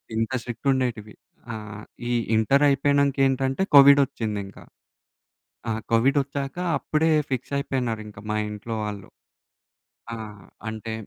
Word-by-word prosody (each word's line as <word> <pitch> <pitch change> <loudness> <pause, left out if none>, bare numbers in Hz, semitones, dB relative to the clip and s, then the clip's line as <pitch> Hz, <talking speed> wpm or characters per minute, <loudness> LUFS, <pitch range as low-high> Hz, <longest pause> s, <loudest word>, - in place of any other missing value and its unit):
ఇంత 115 +3 -1
స్ట్రిక్ట్ 120 +3 -6
ఉండేటివి. 115 -5 -2 0.4
ఆ! - - -4 0.6
ఈ - - 0 0.2
ఇంటర్ 135 +7 +3
అయిపోయినంక 140 0 +2
ఏంటంటే 135 +3 -1
కోవిడొచ్చింది 135 -7 +5
ఇంకా. 100 - -14 1.1
ఆ! - - 0 0.2
కోవిడొచ్చాక 135 +4 +1 0.2
అప్పుడే 160 +1 +1 0.2
ఫిక్స్ 130 +2 -3
అయిపోయినారింకా 115 -7 -3
మా 105 - 0
ఇంట్లో 105 +2 -6
వాళ్ళు. 105 -2 -6 1.1
ఆహ్, 105 -4 -8 0.3
అంటే 110 0 -6
125 Hz, 110 wpm, -24 LUFS, 110-140 Hz, 1.1 s, కోవిడొచ్చింది